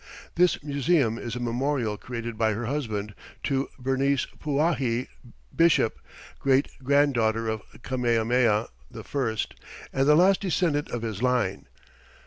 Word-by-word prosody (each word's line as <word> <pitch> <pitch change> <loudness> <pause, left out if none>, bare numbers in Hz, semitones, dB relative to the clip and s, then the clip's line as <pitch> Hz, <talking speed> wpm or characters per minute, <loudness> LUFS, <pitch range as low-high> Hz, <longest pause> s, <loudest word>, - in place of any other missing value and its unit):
This 175 -3 +2
museum 140 -4 +1
is 120 0 -5
a - - -4
memorial, 120 -1 -1
created 115 +1 -6
by 110 0 +1
her 115 +3 -3
husband, 110 -6 -3 0.3
to 135 -1 0
Bernice 135 +1 +1
Pauahi 140 -5 0 0.5
Bishop, 165 - +3 0.4
great 135 0 +2
granddaughter 120 -5 +2
of 110 -1 -2 0.2
Kamehameha 120 -2 +1 0.3
I 125 -6 -2 0.6
and 135 +1 +2
the 150 - +7
last 185 +4 +5
descendant 170 -6 0
of 120 -1 -4
his 110 -2 -4
line. 125 -7 0
125 Hz, 120 wpm, -26 LUFS, 115-145 Hz, 0.6 s, the